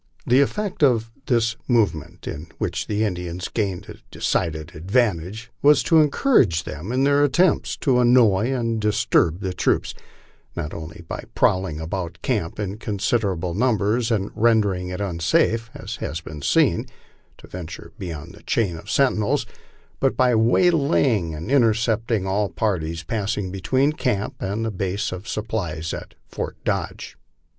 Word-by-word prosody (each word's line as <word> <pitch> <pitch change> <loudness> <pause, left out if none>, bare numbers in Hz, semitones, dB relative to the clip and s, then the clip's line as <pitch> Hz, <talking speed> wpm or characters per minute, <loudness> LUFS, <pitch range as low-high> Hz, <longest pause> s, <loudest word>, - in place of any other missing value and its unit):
The 130 +3 +5
effect 200 +7 -2
of 115 -5 +3 0.2
this 115 -2 +2
movement, 85 - 0
in 80 +2 -6
which - - -2
the 105 +1 0
Indians 90 -3 -3
gained 100 -5 -2
a - - -10
decided 80 0 -1
advantage, 100 +3 -1
was 145 -3 +5
to 160 +3 +5
encourage 140 - +3
them 85 +9 -6
in 130 +2 +1
their 140 +1 +4
attempts 165 +5 +2
to 130 -4 +3
annoy 120 -2 +4
and 115 -4 -1
disturb 95 -4 +2
the 95 -2 -2
troops, - - 0 0.6
not 75 - -4
only 80 +1 -8
by - - -6
prowling 95 -5 +1
about 85 +1 -4
camp 105 -10 -1
in 100 0 -4
consid 105 +2 0
erable 90 -4 -2
numbers 115 0 +1
and 105 -4 0
rendering 105 -5 +2
it 90 +2 -4
unsafe, 100 +5 +1
as - - -6
has 80 - -4
been 75 -2 -9
seen, - - +2 0.5
to - - -14
venture 85 -3 -8
beyond 85 -1 -6
the 105 - -15
chain 100 -7 0
of - - -11
sentinels, 135 0 +2 0.5
but 135 - +1
by 125 -1 +4
waylaying 120 - +3
and 80 +11 -6
intercepting 115 -4 +2
all 100 +1 0
parties 85 -2 -2
passing 100 0 -2
be 95 0 -6
tween 135 +8 +2
camp 110 -9 -1
and 105 +4 -2
the 110 - -1
base 95 +1 -2
of 90 +4 -7
supplies 90 -8 -3
at - - -8
Fort - - -5
Dodge. - - -3
105 Hz, 150 wpm, -23 LUFS, 90-120 Hz, 0.6 s, The